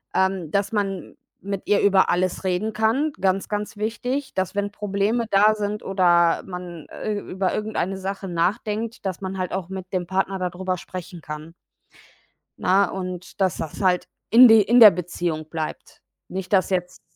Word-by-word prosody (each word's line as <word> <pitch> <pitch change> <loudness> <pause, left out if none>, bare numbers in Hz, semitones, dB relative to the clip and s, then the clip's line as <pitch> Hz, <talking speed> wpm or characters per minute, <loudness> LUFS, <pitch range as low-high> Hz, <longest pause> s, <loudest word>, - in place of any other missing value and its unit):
ähm, 190 -4 0
dass 200 +1 0
man 195 -4 -3 0.2
mit 200 -1 -4
ihr 205 - +3
über 195 -2 +4
alles 185 +2 0
reden 190 +4 0
kann. 230 +9 +1
Ganz, 190 0 0
ganz 210 +1 -3
wichtig, 245 +6 -3
dass 190 +1 -2
wenn 205 0 -1
Probleme 210 +3 -1
da 210 +2 +5
sind 210 0 -3
oder 175 -3 +3
man, 180 -3 -8
äh, 215 - -4
über 190 -1 -2
irgendeine 205 -3 -2
Sache 195 0 -5
nachdenkt, 210 +6 -2
dass 190 -2 -2
man 190 0 -5
halt 185 -1 -3
auch 185 -2 -3
mit 190 -1 -7
dem 180 -2 -2
Partner 190 0 -1
da 180 -1 -1
drüber 185 +1 -3
sprechen 180 0 -8
kann. 150 +2 -8 1.1
Ne, 195 +1 +3
und 185 -1 -6
dass 190 -2 +2
das 160 +5 -5
halt 180 -1 +2 0.2
in 245 +2 +9
de 225 -1 +7
in 240 +5 +4
der 215 -3 +11
Beziehung 170 -2 -4
bleibt. 160 -1 -6 0.3
Nicht, 190 +1 -5
dass 190 -1 +3
jetzt 180 -1 -2
190 Hz, 170 wpm, -23 LUFS, 180-210 Hz, 1.1 s, der